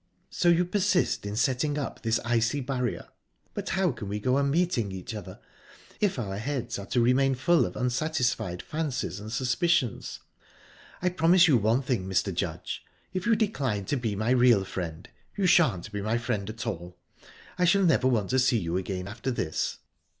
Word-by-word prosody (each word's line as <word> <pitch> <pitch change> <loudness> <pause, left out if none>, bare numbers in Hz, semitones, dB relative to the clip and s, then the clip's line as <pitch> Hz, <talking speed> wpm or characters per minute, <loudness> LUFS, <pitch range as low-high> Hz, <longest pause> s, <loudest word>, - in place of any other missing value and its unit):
"So 175 - +2
you 170 +1 +4
persist 185 - +1
in 100 - -4
setting 135 +5 +1
up 140 - -4
this 115 0 +1
icy 120 +3 +1
barrier? 125 -2 -3 0.4
But - - -4
how 190 -3 +1
can 105 -5 -7
we 105 +1 -2
go 130 +5 +1
on 140 0 +1
meeting 145 - +1
each 95 +4 -6
other, 95 -4 -8 0.6
if 205 -7 +1
our 100 -5 -3
heads 120 -3 -3
are 100 - -8
to 125 - +1
remain 130 +3 +3
full 170 +6 +3
of - - -9
unsatisfied 125 - -1
fancies 140 - -3
and 105 +1 -8
suspicions?...I 130 - -2
promise 180 +1 +5
you 150 - +5
one 110 +6 +2
thing, 115 -8 -1
Mr. 95 - 0
Judge - - -4 0.3
if 185 +3 -2
you 230 - +5
decline 135 - -1
to 145 - -1
be 115 -6 -2
my 110 +4 0
real 120 -6 +5
friend, 85 -2 -5 0.3
you 200 - +1
shan't 120 - +3
be 105 -1 -3
my 110 +3 0
friend 115 -4 -2
at 110 +1 -6
all. 90 0 -5 0.6
I 180 - +4
shall 195 +3 +4
never 160 -7 +3
want 115 -5 +1
to 130 - +3
see 125 -1 +3
you 85 -3 -1
again 95 0 -4
after 110 +6 -4
this." 90 -10 -2
125 Hz, 180 wpm, -27 LUFS, 105-155 Hz, 0.6 s, promise